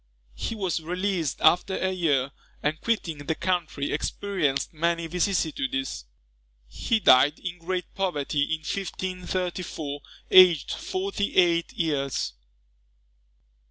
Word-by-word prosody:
He 225 Hz, -, -4 dB
was 190 Hz, -5 st, -1 dB
released 180 Hz, -2 st, -2 dB
after 185 Hz, +2 st, +4 dB
a 190 Hz, -, 0 dB
year; 145 Hz, -7 st, +1 dB, 0.3 s
and 155 Hz, +2 st, -1 dB
quitting 185 Hz, -9 st, -1 dB
the 145 Hz, +2 st, -2 dB
country, 165 Hz, -6 st, -1 dB
experienced 150 Hz, -4 st, -1 dB
many 170 Hz, +1 st, 0 dB
vicissitudes. 155 Hz, -, -1 dB, 0.6 s
He 220 Hz, -, -1 dB
died 140 Hz, -3 st, +6 dB
in 180 Hz, -2 st, -6 dB
great 180 Hz, +1 st, -4 dB
poverty 150 Hz, -6 st, 0 dB
in 160 Hz, -1 st, -2 dB
1534, 180 Hz, -4 st, -4 dB, 0.3 s
aged 180 Hz, -6 st, +7 dB
forty 375 Hz, -, -3 dB
eight 170 Hz, -2 st, +3 dB
years. 140 Hz, -, -1 dB
170 Hz, 105 wpm, -26 LUFS, 145-185 Hz, 0.6 s, aged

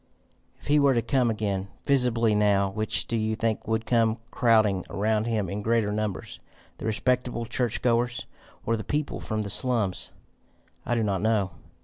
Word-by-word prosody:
"If -, -, -18 dB
he 150 Hz, +1 st, +3 dB
were 140 Hz, -2 st, +4 dB
to 115 Hz, -, +1 dB
come 125 Hz, 0 st, +1 dB
again, 100 Hz, -3 st, -2 dB, 0.2 s
visibly, 120 Hz, -5 st, +3 dB
now, 100 Hz, -2 st, +2 dB
which 110 Hz, +2 st, -1 dB
do 115 Hz, -, -3 dB
you 110 Hz, 0 st, 0 dB
think 110 Hz, -1 st, -2 dB
would 110 Hz, 0 st, -1 dB
come 115 Hz, -2 st, +2 dB
crowding 110 Hz, -6 st, +3 dB
around 110 Hz, +2 st, 0 dB
him 110 Hz, -4 st, -1 dB
in 100 Hz, +3 st, -4 dB
greater 110 Hz, -1 st, +1 dB
numbers 105 Hz, -2 st, -4 dB, 0.4 s
the -, -, -4 dB
respectable 120 Hz, +1 st, 0 dB
church 120 Hz, 0 st, -1 dB
goers, 120 Hz, 0 st, +1 dB, 0.4 s
or 115 Hz, -, +1 dB
the 110 Hz, -, -5 dB
people 150 Hz, 0 st, -3 dB
from 110 Hz, -1 st, -3 dB
the 100 Hz, -, -5 dB
slums? 115 Hz, -6 st, +2 dB, 0.8 s
I 120 Hz, -, +1 dB
do 115 Hz, -, +1 dB
not 100 Hz, -3 st, -1 dB
know. 105 Hz, -4 st, +1 dB
110 Hz, 170 wpm, -26 LUFS, 105-120 Hz, 0.8 s, were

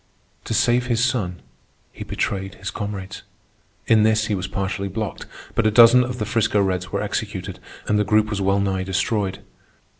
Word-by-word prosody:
To -, -, -2 dB
save 125 Hz, +1 st, +2 dB
his 115 Hz, -1 st, +2 dB
son, 100 Hz, -9 st, -2 dB, 0.5 s
he -, -, -8 dB
betrayed 95 Hz, 0 st, -3 dB
his 95 Hz, +1 st, -6 dB
comrades. 100 Hz, -2 st, -6 dB, 0.6 s
In 110 Hz, -2 st, +4 dB
this 110 Hz, 0 st, +3 dB
he 105 Hz, -, -1 dB
was 95 Hz, -1 st, -2 dB
partially 100 Hz, 0 st, -3 dB
blocked, 105 Hz, +1 st, -5 dB, 0.3 s
but 115 Hz, -, +2 dB
a -, -, +5 dB
dozen 120 Hz, +3 st, +7 dB
of 125 Hz, 0 st, -4 dB
the 105 Hz, -, -2 dB
'Frisco 110 Hz, -1 st, +1 dB
Reds 95 Hz, -2 st, -1 dB
were 100 Hz, -, -1 dB
executed, 100 Hz, -3 st, -4 dB, 0.3 s
and 105 Hz, -, +2 dB
the -, -, +3 dB
group 105 Hz, +1 st, +2 dB
was 100 Hz, -1 st, -2 dB
well 100 Hz, +1 st, +2 dB
nigh 95 Hz, -1 st, 0 dB
destroyed. 95 Hz, +1 st, -1 dB
105 Hz, 180 wpm, -22 LUFS, 95-110 Hz, 0.6 s, dozen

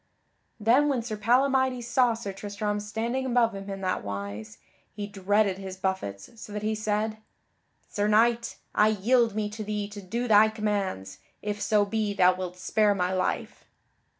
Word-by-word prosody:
Then 245 Hz, +7 st, +4 dB
when 255 Hz, -5 st, 0 dB
Sir 225 Hz, -2 st, -4 dB
Palamydes 255 Hz, +3 st, +2 dB
saw 240 Hz, 0 st, +3 dB
Sir 205 Hz, -4 st, -6 dB
Tristram 205 Hz, +1 st, -3 dB
standing 225 Hz, +5 st, -2 dB
above 240 Hz, -3 st, +2 dB
him 195 Hz, 0 st, -7 dB
in 195 Hz, 0 st, -5 dB
that 185 Hz, -1 st, -1 dB
wise, 100 Hz, +2 st, -6 dB, 0.4 s
he 205 Hz, -1 st, -4 dB
dreaded 200 Hz, 0 st, +1 dB
his 190 Hz, -1 st, -7 dB
buffets 190 Hz, -, -4 dB
so -, -, -9 dB
that 210 Hz, 0 st, -4 dB
he 215 Hz, +1 st, 0 dB
said: 215 Hz, 0 st, -1 dB, 0.7 s
"Sir 205 Hz, 0 st, -1 dB
Knight, 235 Hz, +2 st, +2 dB, 0.2 s
I 210 Hz, -, +4 dB
yield 220 Hz, +2 st, +2 dB
me 215 Hz, -1 st, 0 dB
to 215 Hz, 0 st, -6 dB
thee 210 Hz, -1 st, -3 dB
to 205 Hz, 0 st, -8 dB
do 235 Hz, +6 st, -3 dB
thy 215 Hz, 0 st, +6 dB
commands, 200 Hz, -, -3 dB, 0.2 s
if 210 Hz, 0 st, -3 dB
so 210 Hz, -2 st, +3 dB
be 210 Hz, 0 st, -1 dB
thou 185 Hz, -1 st, +5 dB
wilt 180 Hz, -1 st, -6 dB
spare 205 Hz, +2 st, +2 dB
my 180 Hz, -1 st, 0 dB
life." 185 Hz, 0 st, -2 dB
210 Hz, 170 wpm, -27 LUFS, 195-225 Hz, 0.7 s, thy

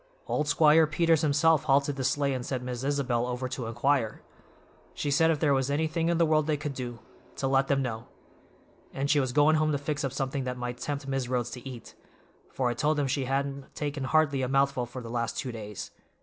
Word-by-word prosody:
Old 150 Hz, -, -1 dB
Squire 155 Hz, +1 st, +5 dB
Peters 165 Hz, 0 st, +2 dB
himself 155 Hz, 0 st, +3 dB
halted 140 Hz, 0 st, +2 dB
the 135 Hz, -, -3 dB
sleigh 140 Hz, +1 st, +1 dB
and 130 Hz, -1 st, -3 dB
sent 125 Hz, 0 st, -3 dB
Miss 125 Hz, 0 st, -5 dB
Isabel 130 Hz, -4 st, 0 dB
over 125 Hz, +1 st, -3 dB
to 125 Hz, -2 st, -4 dB
inquire. 120 Hz, 0 st, 0 dB, 0.7 s
She 145 Hz, -, -2 dB
said 160 Hz, +3 st, +4 dB
if 160 Hz, -2 st, +1 dB
there 145 Hz, -3 st, +3 dB
was 135 Hz, 0 st, +1 dB
anything 160 Hz, +3 st, 0 dB
in 170 Hz, -, +2 dB
the 170 Hz, -, +4 dB
world 155 Hz, -1 st, +2 dB
they 155 Hz, -1 st, +1 dB
could 150 Hz, -1 st, -4 dB
do, 125 Hz, -3 st, -5 dB, 0.4 s
to 135 Hz, -, -2 dB
let 135 Hz, 0 st, +2 dB
them 135 Hz, -1 st, +1 dB
know; 115 Hz, -2 st, -4 dB, 0.9 s
and 140 Hz, +1 st, 0 dB
she 150 Hz, -, +4 dB
was 130 Hz, -2 st, 0 dB
goin' 150 Hz, +4 st, +4 dB
home 155 Hz, 0 st, +2 dB
to 145 Hz, -, +1 dB
fix 145 Hz, +1 st, -3 dB
up 135 Hz, -, -1 dB
something 135 Hz, 0 st, -2 dB
that 125 Hz, 0 st, -4 dB
might 125 Hz, 0 st, -5 dB
tempt 140 Hz, 0 st, -4 dB
Mis' 135 Hz, -2 st, -1 dB
Rhodes 125 Hz, -2 st, -1 dB
to 125 Hz, +1 st, -7 dB
eat, 120 Hz, -3 st, -10 dB, 0.6 s
for 130 Hz, -, -1 dB
I 120 Hz, -, +1 dB
told 150 Hz, +5 st, +1 dB
them 145 Hz, -, +1 dB
she 135 Hz, 0 st, -1 dB
hadn't 140 Hz, +1 st, -3 dB
taken 145 Hz, -2 st, -3 dB
hardly 145 Hz, -2 st, +2 dB
a 130 Hz, -, 0 dB
mouthful 135 Hz, -2 st, +1 dB
for 125 Hz, +1 st, -8 dB
the 115 Hz, -, -7 dB
last 115 Hz, -1 st, -2 dB
two 130 Hz, -, -3 dB
days. 105 Hz, -3 st, -7 dB
135 Hz, 225 wpm, -28 LUFS, 125-150 Hz, 0.9 s, Squire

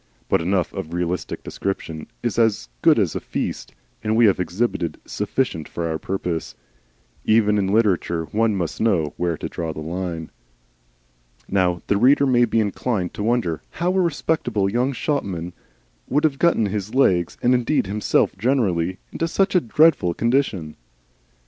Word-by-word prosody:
But -, -, +3 dB
enough 90 Hz, +1 st, 0 dB
of 80 Hz, +2 st, -5 dB
realistic 90 Hz, 0 st, -3 dB
description 80 Hz, -5 st, -4 dB, 0.2 s
is -, -, -1 dB
as 110 Hz, -, +2 dB
good -, -, +5 dB
as -, -, +1 dB
a -, -, -1 dB
feast, -, -, -4 dB, 0.3 s
and 110 Hz, 0 st, +1 dB
we 115 Hz, +1 st, +5 dB
have 100 Hz, -3 st, +3 dB
exhibited 90 Hz, -3 st, -1 dB
enough 105 Hz, -6 st, -2 dB
for 85 Hz, -1 st, -3 dB
our 80 Hz, -1 st, -2 dB
purpose. 90 Hz, -4 st, -3 dB, 0.7 s
Even 105 Hz, -1 st, +3 dB
in 95 Hz, -, 0 dB
literature 95 Hz, -5 st, +1 dB
one 110 Hz, 0 st, +2 dB
must 85 Hz, -5 st, -3 dB
know 90 Hz, -10 st, +1 dB
where 85 Hz, -2 st, -1 dB
to -, -, -4 dB
draw 80 Hz, -1 st, -4 dB
the 75 Hz, -, -7 dB
line. 85 Hz, 0 st, -4 dB, 1.2 s
Now 90 Hz, -3 st, +1 dB
the 100 Hz, -, +1 dB
reader 135 Hz, +6 st, +5 dB
may 120 Hz, -2 st, +4 dB
be 115 Hz, 0 st, +1 dB
inclined 105 Hz, -2 st, -1 dB
to -, -, -6 dB
wonder 110 Hz, -8 st, 0 dB
how 175 Hz, +2 st, -1 dB
a 190 Hz, -, +3 dB
respectable 140 Hz, -, 0 dB
young 125 Hz, +4 st, +1 dB
shopman 95 Hz, -, -2 dB, 0.6 s
should 145 Hz, +4 st, +2 dB
have 145 Hz, -3 st, +1 dB
got 170 Hz, 0 st, +4 dB
his 105 Hz, 0 st, -2 dB
legs, 90 Hz, -10 st, +2 dB
and 125 Hz, -, +4 dB
indeed 125 Hz, +2 st, +1 dB
himself 105 Hz, +2 st, +1 dB
generally, 95 Hz, -8 st, +1 dB
into 165 Hz, -, -1 dB
such 195 Hz, +4 st, +1 dB
a 180 Hz, -, +4 dB
dreadful 130 Hz, -, +3 dB
condition. 115 Hz, -, 0 dB
100 Hz, 160 wpm, -22 LUFS, 85-120 Hz, 1.2 s, good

